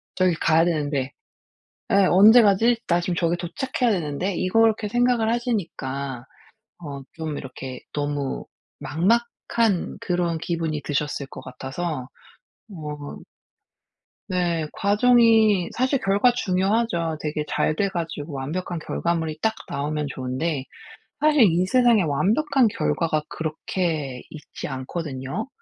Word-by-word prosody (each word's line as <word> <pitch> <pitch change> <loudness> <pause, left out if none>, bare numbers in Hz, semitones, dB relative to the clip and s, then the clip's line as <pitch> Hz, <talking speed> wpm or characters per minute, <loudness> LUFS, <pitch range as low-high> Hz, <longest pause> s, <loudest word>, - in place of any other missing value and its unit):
저기 185 -1 +3
가야 160 0 +3
되는데.' 145 -5 -1 0.8
예. - - +5 0.2
'언제 215 +6 +8
가지? 225 +4 +4
나 170 0 +3
지금 175 0 -2
저기 170 0 +1
도착해야 235 +8 -1
되는데?' 180 +1 -2
이걸 225 +5 +3
이렇게 220 -1 -1
생각을 240 -1 +2
하시니까 140 - -3 0.6
어 140 -2 -6
좀 160 -3 -4
이렇게 130 -1 -8
너무 145 -2 -2 0.4
막막한 215 - 0
그런 175 -2 0
기분이 160 -3 -2
드셨을 145 -1 -2
것 - - -10
같아서 135 +2 -5 0.6
어. 150 -5 -7 1.1
네. 175 -3 0
과정이 220 -2 +4
사실 260 +2 +1
결과 200 +5 +3
중요하죠. 190 -5 0
되게 150 0 -2
잘 155 - 0
돼 200 +4 +1
가지고 165 -4 -5
완벽한 160 +6 -4
결과물이 160 -1 -2
딱 220 0 +2
나오면 150 +1 -2
좋은데 130 +3 -3 0.6
사실 300 -3 +4
이 175 +3 +1
세상에 240 -1 +4
완벽한 220 - +2
결과가 155 - 0
그렇게 155 -4 -3
있지 155 -2 -8
않거든요. 135 - -4
170 Hz, 265 characters per minute, -24 LUFS, 150-210 Hz, 1.1 s, 언제